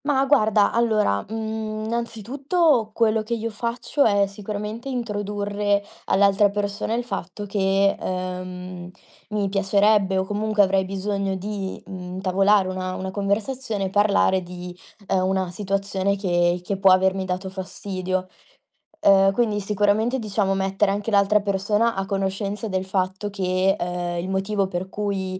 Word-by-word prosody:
Ma 275 Hz, -2 st, +2 dB
guarda 215 Hz, -7 st, +4 dB
allora, 215 Hz, -, +2 dB
mhmm, 220 Hz, -1 st, -4 dB
innanzitutto 235 Hz, -, 0 dB
quello 220 Hz, 0 st, +2 dB
che 225 Hz, +2 st, -2 dB
io 230 Hz, 0 st, -3 dB
faccio 235 Hz, +6 st, -1 dB
è 200 Hz, -4 st, +4 dB
sicuramente 210 Hz, +4 st, -6 dB
introdurre 205 Hz, -3 st, -1 dB, 0.2 s
all'altra 200 Hz, +1 st, +4 dB
persona 205 Hz, +2 st, -2 dB
il 240 Hz, -, -1 dB
fatto 195 Hz, -2 st, -5 dB
che, 195 Hz, 0 st, +2 dB
ehm, 185 Hz, -1 st, -5 dB, 0.4 s
mi 210 Hz, -2 st, -1 dB
piacerebbe 200 Hz, 0 st, +3 dB
o 190 Hz, -, +2 dB
comunque 210 Hz, +1 st, +2 dB
avrei 190 Hz, 0 st, +2 dB
bisogno 195 Hz, 0 st, -2 dB
di, 195 Hz, 0 st, -4 dB
mhmm, 180 Hz, -1 st, -7 dB
intavolare 195 Hz, +1 st, +3 dB
una 185 Hz, 0 st, -3 dB
una 190 Hz, 0 st, -4 dB
conversazione 205 Hz, +2 st, -2 dB
e -, -, -2 dB
parlare 200 Hz, -2 st, +3 dB
di, 180 Hz, 0 st, -8 dB, 0.3 s
ehm, 185 Hz, -1 st, +1 dB
una 190 Hz, -2 st, 0 dB
situazione 195 Hz, 0 st, -1 dB
che 175 Hz, -2 st, +1 dB
che 195 Hz, +2 st, -2 dB
può 195 Hz, 0 st, +5 dB
avermi 190 Hz, +1 st, +3 dB
dato 185 Hz, +1 st, -3 dB
fastidio. 185 Hz, -1 st, -4 dB, 0.7 s
Ehm, 195 Hz, -4 st, +5 dB
quindi 210 Hz, 0 st, +1 dB
sicuramente 210 Hz, +4 st, +1 dB
diciamo 205 Hz, -4 st, 0 dB
mettere 195 Hz, +1 st, +1 dB
anche 205 Hz, +3 st, -2 dB
l'altra 200 Hz, +1 st, +4 dB
persona 205 Hz, +3 st, +1 dB
a 195 Hz, 0 st, -2 dB
conoscenza 195 Hz, +2 st, -2 dB
del 185 Hz, -2 st, -1 dB
fatto 190 Hz, +1 st, -2 dB
che, 190 Hz, -1 st, +1 dB
ehm, 175 Hz, 0 st, -2 dB
il 175 Hz, -, -4 dB
motivo 195 Hz, +1 st, 0 dB
per 185 Hz, 0 st, -4 dB
cui, 195 Hz, -2 st, -3 dB
200 Hz, 140 wpm, -23 LUFS, 190-215 Hz, 0.7 s, può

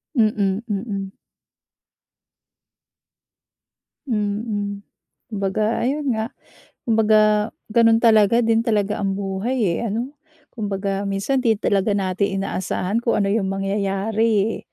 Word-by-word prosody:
Mm. 210 Hz, -4 st, +1 dB
Mm. 200 Hz, -2 st, -3 dB, 3.0 s
Mm. 205 Hz, -2 st, -2 dB, 0.5 s
Kumbaga 210 Hz, +1 st, -1 dB
ayun 275 Hz, 0 st, 0 dB
nga, 220 Hz, +2 st, -3 dB, 0.6 s
kumbaga 215 Hz, -1 st, +3 dB, 0.2 s
gano'n 225 Hz, -1 st, +5 dB
talaga 225 Hz, -1 st, +5 dB
din 225 Hz, -1 st, +2 dB
talaga 210 Hz, -3 st, 0 dB
ang 195 Hz, 0 st, -1 dB
buhay 200 Hz, +1 st, -1 dB
eh, 230 Hz, -, -2 dB
ano? 240 Hz, +7 st, -3 dB, 0.4 s
Kumbaga 200 Hz, -3 st, -2 dB
minsan 200 Hz, +7 st, -1 dB
'di 225 Hz, -4 st, +2 dB
talaga 200 Hz, 0 st, +1 dB
natin 195 Hz, +1 st, -1 dB
inaasahan 195 Hz, +2 st, -2 dB
kung 235 Hz, -2 st, +1 dB
ano 200 Hz, -, +1 dB
yung 195 Hz, -1 st, 0 dB
mangyayari, 195 Hz, +3 st, 0 dB, 0.2 s
eh. -, -, -6 dB
210 Hz, 105 wpm, -21 LUFS, 195-225 Hz, 3.0 s, gano'n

